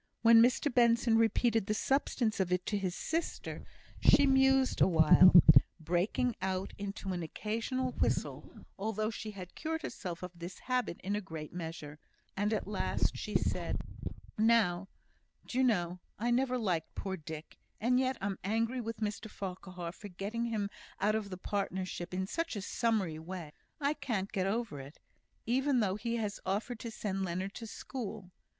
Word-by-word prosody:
When 230 0 +8
Mr 245 +3 +3
Benson 235 -1 +4
repeated 225 -1 +3
the 215 - +1
substance 240 -3 +1
of 185 -2 0
it 180 0 +1
to 210 - 0
his 185 -2 -2
sister, 330 +1 -3 0.4
she 285 - +7
mused 265 -1 +4
awhile, 175 +1 +8 0.4
breaking 180 +9 0
out 190 0 -2
into 200 -1 -4
an 175 - -3
occasional 230 - -2
whistle - - -2
(although 215 +1 -1
she 215 0 -6
had 185 -4 -9
cured 320 0 -3
herself 180 -1 -5
of 180 - -5
this 175 +1 -8
habit 250 -8 -1
in 200 +2 -1
a 210 - -1
great 160 -5 -7
measure), 160 -3 -6 0.4
and 205 +2 0
at 215 - 0
last 210 - 0
she - - -5
said: - - 0 0.6
"Now, 215 -5 +3 0.6
do 255 - -2
you - - +5
know, 180 -7 +1 0.2
I 235 +3 0
never 255 +1 +2
liked 180 -9 -1
poor 190 -1 -3
Dick; 155 -2 -9 0.2
and 250 +4 +3
yet 260 -1 +1
I'm 195 -1 -2
angry 225 +5 0
with 225 -1 -5
Mr 215 +1 -3
Farquhar 180 -3 -6
for 205 +3 -10
getting 205 +6 -3
him 210 -3 -2 0.3
out 210 +2 +2
of 215 -2 -2
the 185 - -6
partnership 185 -2 -3
in 185 +1 -1
such 330 - -2
a 205 - -4
summary 200 -9 0
way. 170 -2 -7 0.3
I 285 0 +1
can't 210 -10 -3
get 190 -1 0
over 215 -7 -2
it, 135 +3 -10 0.5
even 265 +3 +2
though 195 -4 +1
he 230 +3 -2
has 210 -3 -2
offered 215 +5 -2
to 230 - -5
send 195 -3 -3
Leonard 185 +2 -3
to 230 - -7
school. 215 -6 -6
205 Hz, 170 wpm, -32 LUFS, 185-235 Hz, 0.6 s, When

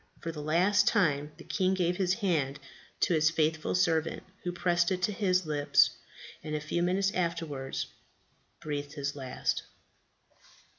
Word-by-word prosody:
For 165 - -4
the 155 -2 -7
last 185 +7 +3
time 150 -8 +2
the - - -11
king 190 -1 +1
gave 175 -1 0
his 185 -1 +2
hand 160 -10 0 0.4
to - - +3
his 155 -1 +4
faithful 160 0 0
servant, 165 -3 +1 0.2
who 175 - -1
pressed 175 0 +1
it 185 -1 -1
to 210 - +2
his 185 -3 +1
lips, 145 -4 +4 0.5
and 155 -1 -3
a - - 0
few 155 +3 -2
minutes 190 +3 +2
afterwards 165 -6 -2 0.8
breathed 145 -1 -4
his 140 -2 -3
last. 130 -3 -2
165 Hz, 150 wpm, -30 LUFS, 150-185 Hz, 0.8 s, his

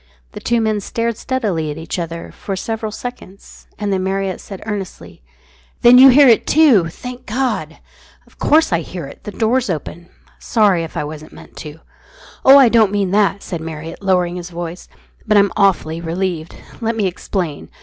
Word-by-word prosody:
The - - -8
two 235 -1 0
men 215 -1 0
stared 230 +3 -2
steadily 210 - -2
at 150 - -5
each 165 +3 -5
other 170 0 -6
for 195 - -6
several 220 +2 -4
seconds, 220 -4 -10
and 205 -1 -2
then 185 -1 -1
Marriott 190 0 -2
said 195 -2 -10
earnestly 205 - -7 0.6
"Then 245 +1 +8
you 270 +1 +10
hear 275 +2 +7
it 230 -3 +4
too, 270 - +5
thank 250 +8 -9
God!" 215 - -2 0.5
"Of - - -26
course 310 - +3
I 170 - +2
hear 175 0 -7
it. 135 - -13
The 210 - -5
door's 230 +3 0
open. 170 +1 -5 0.3
Sorry 200 -7 +2
if 165 - -8
I - - -1
wasn't 155 +1 -9
meant - - -15
to." 155 +1 -9 0.6
"Oh, 270 +1 +8
I 270 -3 +7
don't 225 -3 +4
mean 200 -3 0
that," 200 0 +1
said 170 -4 -5
Marriott, 160 +1 -7
lowering 180 -2 +1
his 175 0 -7
voice. 175 0 -7 0.4
"But 210 -1 +4
I'm 200 -1 +4
awfully 180 -5 +1
relieved. 170 -1 -3 0.3
Let 230 0 -1
me 215 -3 0
explain. 180 -4 -4
195 Hz, 180 wpm, -18 LUFS, 170-225 Hz, 0.6 s, you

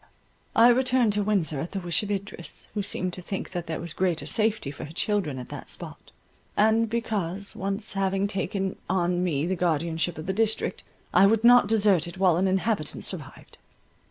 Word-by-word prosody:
I 230 +2 +7
returned 250 -3 +3
to 205 - +1
Windsor 195 -8 0
at 165 +7 -5
the 195 - -2
wish 175 +1 0
of 205 - -5
Idris, 200 -3 -5
who 210 - -1
seemed 185 -2 -2
to 180 - -5
think 190 +2 -5
that 175 -2 -4
there 160 - -3
was 170 -1 -6
greater 180 -3 0
safety 215 -9 0
for 140 - -8
her 150 - -10
children 180 -5 -1
at 125 - -8
that - - -8
spot; - - -5 0.5
and 220 +1 +3
because, 200 -4 -2
once 200 +3 -3
having 195 0 0
taken 195 -1 -2
on 180 -1 +1
me 155 -4 0
the 190 +2 0
guardianship 165 0 0
of 155 - -6
the 190 - -1
district, 220 +2 0 0.3
I 190 +2 +7
would 220 +2 +2
not 245 -2 +7
desert 200 -6 +3
it 170 - -9
while 185 -3 +3
an 190 +2 +2
inhabitant 190 -3 0
survived. - - -4
190 Hz, 190 wpm, -26 LUFS, 175-210 Hz, 0.5 s, I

